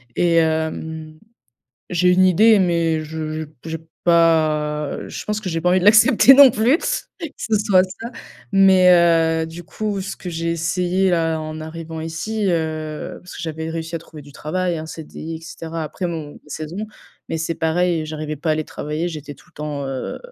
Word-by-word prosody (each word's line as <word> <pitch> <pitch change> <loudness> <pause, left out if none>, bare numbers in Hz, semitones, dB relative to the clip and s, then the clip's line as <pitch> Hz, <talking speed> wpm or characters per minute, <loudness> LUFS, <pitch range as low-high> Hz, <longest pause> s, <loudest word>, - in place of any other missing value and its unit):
Et 170 -1 +2
hem, 160 -1 -1 0.7
j'ai 180 +1 +3
une 185 +1 +5
idée, 215 +4 +5
mais 170 -3 +1
je 155 0 -5
j - - -7 0.2
j'ai 160 0 -4 0.3
pas 155 -3 +2
je - - -7
pense 210 0 -1
que 190 - -5
j'ai 165 -1 -2
pas 180 - +1
envie 185 0 +3
de - - -2
l'accepter 225 +5 +7
non 275 -1 +9
plus, 240 +9 +2 0.4
que 330 - -3
ce 215 -2 0
soit 200 -3 +4
ça. 225 +6 -8 0.4
Mais, 190 -2 +6 0.5
heu, - - -5
du 165 +2 -9
coup, 210 +1 -3
ce 195 +1 -5
que 180 - -7
j'ai 165 0 -2
essayé 180 +3 0
là 165 -2 +1
en 155 0 -6
arrivant 160 0 -7
ici, 195 +7 -3
heu, 155 -2 -3
parce 180 - -11
que - - -7
j'avais 160 0 -4
réussi 165 0 -5
à 165 - -1
trouver 155 -2 -13
du 145 0 -15
travail, 175 +3 -2
un 155 - -6
CDI 160 0 -8
et - - -11
cetera 165 0 -6
après 180 +4 -4
mon 155 -4 -5
mes - - -13
saisons. 165 +8 -5 0.4
Mais 165 - -2
c'est 165 +1 -2
pareil, 165 +1 +1
heu, - - -5
j'arrivais 155 -1 -5
pas 160 +3 -2
à - - +4
aller 155 0 -1
travailler, 155 +4 -4
j'étais 150 -3 -7
tout - - -22
le - - -40
temps, 145 -2 -4
heu, 135 -1 -4
165 Hz, 200 wpm, -20 LUFS, 155-185 Hz, 0.7 s, non